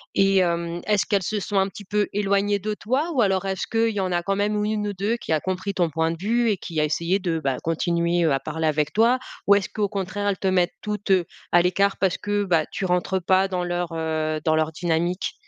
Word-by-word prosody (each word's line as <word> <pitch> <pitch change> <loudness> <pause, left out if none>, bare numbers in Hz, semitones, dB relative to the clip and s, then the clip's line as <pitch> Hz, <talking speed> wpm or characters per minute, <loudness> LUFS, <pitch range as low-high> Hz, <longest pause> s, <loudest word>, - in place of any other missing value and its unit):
et 195 0 +4
hem, 170 -1 -1
est-ce 210 -2 +2
qu'elles 200 -2 +1
se 210 +3 -2
sont 200 0 -1
un 190 - +2
petit 205 0 -11
peu 205 +1 0
éloignées 200 0 +1
de 210 +2 -3
toi? 260 +10 -1
Ou 250 - +2
alors, 190 -1 +1
est-ce 190 -1 -2
qu'il 225 -1 +1
y 205 - -2
en 185 -1 -1
a 175 0 0
quand 195 +1 0
même 205 +1 0
ou 210 0 0
1 210 -1 -1
ou 205 - -3
2 205 +5 -1
qui - - -7
a 155 - +3
compris 190 +3 -3
ton 175 -4 +1
point 160 +2 0
de 165 - -5
vue 230 +3 +1
et 200 - +1
qui 165 -3 -4
a - - +3
essayé 170 +6 0
de, 170 -3 -1
bah, 135 -4 -1
continuer, 170 +1 +1
heu, 160 - +3
à 135 - +1
parler 160 +3 -3
avec 150 -1 0
toi? 235 +4 +4 0.3
Ou 200 - +6
est-ce 200 -1 +1
qu'au 205 -2 -1
contraire, 205 0 -3
elles 195 -2 0
te 190 - -1
mettent 180 -2 +2
toutes, 210 -1 -3
heu, 180 -3 +4 0.3
à 175 - +6
l'écart 195 +3 +1
parce 190 -2 +1
que, 205 0 -1
bah, 165 -4 +2
tu 190 - -3
rentres 180 0 0
pas 190 +2 +3
dans 180 -2 -2
leur, 175 0 -2
heu, 155 -1 -1
dans 160 0 +2
leur 155 0 +1
dynamique? 175 +3 -1
190 Hz, 260 wpm, -24 LUFS, 170-205 Hz, 0.3 s, Ou